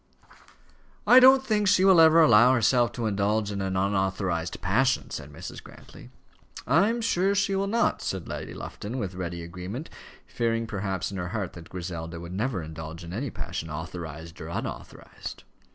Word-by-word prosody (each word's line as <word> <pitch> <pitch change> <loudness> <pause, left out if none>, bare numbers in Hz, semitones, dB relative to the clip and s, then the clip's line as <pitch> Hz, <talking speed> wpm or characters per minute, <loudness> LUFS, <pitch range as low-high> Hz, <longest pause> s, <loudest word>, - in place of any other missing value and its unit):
"I 250 - +8
don't 265 +1 +7
think 210 -4 +1
she 185 0 +4
will 190 -4 +7
ever 160 +1 +7
allow 120 -2 +6
herself 120 +1 +3
to 120 -1 -3
indulge 105 0 0
in 100 -1 -3
an 95 -1 -2
unauthorized 95 -3 -1
passion," 125 +9 +1
said - - -7
Mrs. - - -8
Grantly. - - -14 0.6
"I 195 +6 +4
am 235 +1 -1
sure 195 -3 +1
she 200 -1 +1
will 195 +1 0
not," 220 - +1
said 95 -2 -4
Lady - - -6
Lufton, 110 +5 -6
with 100 -7 -3
ready 85 -2 -5
agreement, 90 - -7 0.3
fearing 115 -1 -1
perhaps 95 -4 -3
in 100 - -6
her 90 -1 -3
heart 100 -3 -4
that 85 -2 -12
Griselda 85 -2 -6
would 85 +1 -8
never 105 -2 -2
indulge 80 +2 -8
in 85 +1 -8
any 130 +7 -3
passion, 80 - -6
authorized 80 0 -7
or - - -6
unauthorized. - - -7
100 Hz, 170 wpm, -26 LUFS, 90-135 Hz, 0.6 s, I